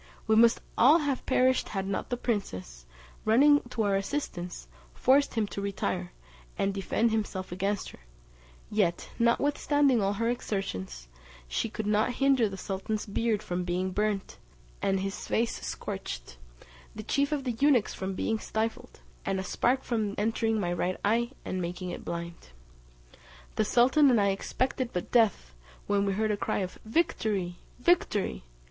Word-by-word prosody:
We 220 - +3
must 230 +1 +5 0.2
all 280 +7 +8
have 290 -5 -1
perished 255 0 +3
had 195 -2 -2
not 195 - -3
the 245 - -1
princess, 95 - -3 0.4
running 285 +7 +5
to 230 -3 -1
our 200 -1 +2
assistance, 195 - -3 0.3
forced 275 +1 +3
him 220 -2 +2
to 200 - -5
retire, 185 -2 -2 0.5
and 195 0 +1
defend 215 +4 +1
himself 205 -4 -2
against 195 +2 -1
her; - - -15 0.7
yet, 195 -5 0
notwithstanding 280 +1 +3
all 195 +1 +1
her 230 +3 -1
exertions, 95 - -3 0.4
she 220 - -1
could 220 -1 -4
not 215 +4 +2
hinder 270 -5 +3
the 195 - -7
sultan's 195 +3 -3
beard 215 0 0
from 180 0 -2
being 180 +1 -1
burnt, 210 0 -1 0.4
and 195 -1 +1
his 195 0 -4
face 230 +1 0
scorched, - - -6 0.6
the - - -6
chief 280 +1 +1
of 290 -2 -1
the 245 -3 -2
eunuchs 275 -6 +4
from 190 0 -4
being 220 +3 -1
stifled, 225 +4 -3 0.2
and 195 -1 -1
a - - -2
spark 250 +7 +1
from 215 -4 -1
entering 225 +1 +1
my 175 -3 -1
right 180 +1 -1
eye, 235 +3 +2 0.2
and 185 - -2
making 180 +1 -4
it - - -7
blind. 170 - -6 1.1
The 215 - +2
sultan 265 +6 +5
and 240 -4 +4
I 200 -1 +3
expected 250 +5 -1
but 180 - -3
death, 210 - +2 0.3
when 200 0 +1
we 195 - +1
heard 215 +2 +1
a 205 - 0
cry - - -1
of 185 -1 -5
"Victory! 215 - 0 0.2
Victory!" 215 - +1
210 Hz, 160 wpm, -29 LUFS, 190-240 Hz, 1.1 s, all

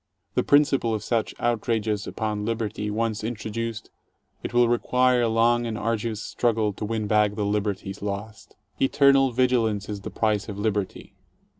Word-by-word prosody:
The - - +2
principle 140 -6 +3
of 105 - -5
such 115 -3 -1
outrages 110 -3 -1
upon 105 -2 -3
liberty 110 -1 -2
once 110 0 -1
introduced, 115 0 -4 0.5
it - - -5
will 120 0 +4
require 125 +1 +2
a 120 - +2
long 120 +1 +2
and 110 -2 -3
arduous 110 -1 -2
struggle 110 -3 0
to 105 - -5
win 110 0 -2
back 105 -1 +2
the 105 -1 -1
liberties 100 -1 -2
lost. 105 +1 -6 0.3
"Eternal 135 -1 +4
vigilance 115 -5 +1
is 105 -1 -5
the - - -6
price 105 -1 0
of 100 - -6
liberty." 105 -2 -3
110 Hz, 155 wpm, -25 LUFS, 105-120 Hz, 0.5 s, will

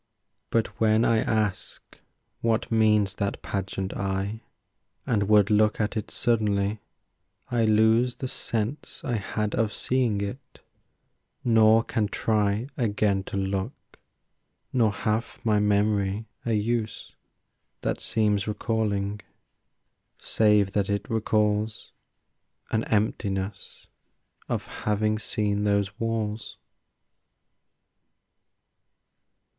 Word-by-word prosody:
But 115 -1 +2 0.2
when 110 +1 +4
I 115 -1 +3
ask 110 -3 -2 0.4
what 115 0 0
means 105 -3 +3
that 100 -1 -2
pageant 95 -1 -3
I 100 +3 -2 0.6
And 105 -4 0
would 105 -1 +5
look 105 0 +3
at 105 +1 -1
it 110 - -3
suddenly, 105 -3 0 0.7
I 120 -2 +2
lose 110 +3 +4
The 130 - -4
sense 115 +2 -3
I 120 -3 -1
had 105 +1 -2
of 110 -2 +1
seeing 125 -5 0
it, 100 +7 -6 0.8
nor 115 -1 +5
can 110 -2 -1
try 105 +1 0
Again 105 -4 +1
to - - -4
look, 95 0 -4 0.7
nor 115 -5 +3
hath 110 +2 -2
my 105 -2 +3
memory 105 0 +1 0.2
a 115 - +1
use 110 +1 -2 0.7
That - - -1
seems 105 -3 +1
recalling, 105 -2 -1 1.0
save 105 -3 +3
that 100 -1 0
it 100 0 -1
recalls 110 0 0 0.8
An 110 0 +1
emptiness 100 -2 -2 0.6
of - - -1
having 105 0 -1
seen 105 -2 -1
those 100 0 0
walls. 115 -1 -3
105 Hz, 100 wpm, -26 LUFS, 100-110 Hz, 1.0 s, would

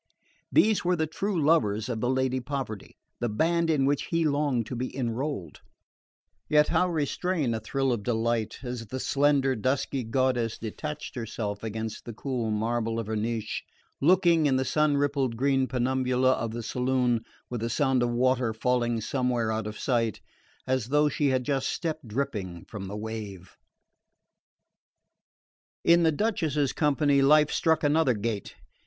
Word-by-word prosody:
These 215 -1 +4
were 180 +1 +2
the 160 -2 0
true 190 +4 -2
lovers 115 -9 +2
of 115 -3 -3
the 125 - +1
Lady 130 0 +1
Poverty, 125 -5 -5 0.2
the 120 - -1
band 165 +9 +1
in 145 -4 +2
which 140 0 +1
he 165 -1 0
longed 140 -5 +1
to 125 - -5
be 130 +2 -4
enrolled; 120 - -3 0.9
yet 150 0 +4
how 180 - +2
restrain 160 -3 -1
a 110 - -2
thrill 135 +4 -1
of 115 - -3
delight 115 0 -1
as 120 -3 -5
the 130 +5 -5
slender 140 -1 +2
dusky 130 +3 -1
goddess 120 -1 0
detached 150 +7 -6
herself 110 -4 -4
against 110 0 -5
the 120 - -6
cool 125 -3 -2
marble 115 +1 -1
of 115 - -3
her 110 +1 -3
niche, 110 0 -2 0.4
looking, 170 -1 +4
in 135 - +2
the 130 0 +1
sun 150 0 +2
rippled 140 -4 0
green 135 0 +2
penumbra 130 0 0
of 115 -3 +1
the 115 +1 -5
saloon, 125 -1 0 0.3
with 120 -2 -3
a 115 - -1
sound 135 0 +2
of 120 - +1
water 125 -1 +1
falling 120 -1 0
somewhere 125 -2 0
out 110 -1 -2
of 105 - -6
sight, 115 -4 0 0.5
as 130 -3 0
though 150 +2 +3
she 145 +1 0
had 130 -1 +1
just 135 -1 0
stepped 160 -6 -3
dripping 105 -8 -3
from 100 -3 -7
the 100 +2 -5
wave? 105 -4 -7 2.3
In 170 +1 +5
the 165 -1 +4
Duchess's 155 - 0
company 145 -2 +2
life 150 +2 +5
struck 160 -1 +2
another 145 -3 +3
gait. 105 -1 -4
130 Hz, 160 wpm, -27 LUFS, 115-145 Hz, 2.3 s, In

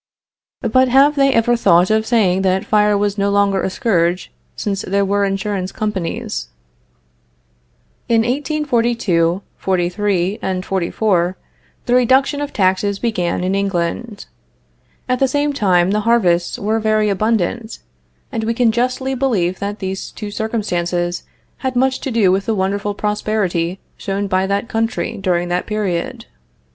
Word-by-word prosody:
But 255 +1 +3
have 275 +4 +5
they 275 -1 +4
ever 240 0 +3
thought 180 -4 +4
of 220 0 +1
saying 195 -6 +2
that 190 0 +1
fire 210 -1 +3
was 205 0 -1
no 200 0 +2
longer 200 -1 +2
a - - -1
scourge, 180 -3 0 0.2
since 200 -1 -2
there 200 +1 0
were 200 +1 +1
insurance 195 -1 -2
companies? 185 - -3 1.6
In 230 -1 +4
1842, 235 - 0
'43 190 +1 0
and 185 0 -2
'44, 185 -1 0 0.5
the 245 - 0
reduction 265 +4 +3
of 290 - -3
taxes 195 +1 +1
began 180 -7 -1
in 185 +1 0
England. 195 +2 -2 0.8
At 255 -1 0
the 270 - +3
same 290 +2 0
time 185 -7 +2
the 210 - +1
harvests 195 -6 +2
were 215 +2 0
very 215 -1 +2
abundant, 220 +2 -1 0.5
and 225 -4 -2
we 230 +1 -1
can 235 -2 +3
justly 250 +3 -1
believe 215 -10 0
that 205 +1 -3
these 190 -1 -4
two 210 -1 -7
circumstances 175 -6 -2 0.3
had 260 -1 -3
much 260 +1 +2
to - - -4
do 220 -6 +3
with 195 +1 0
the 225 - +1
wonderful 200 +1 -1
prosperity 200 -4 -1 0.2
shown 200 +1 -2
by 190 0 0
that 200 +3 -1
country 225 0 -2
during 175 -3 0
that 175 +1 -1
period. 200 -6 -2
205 Hz, 145 wpm, -18 LUFS, 185-230 Hz, 1.6 s, have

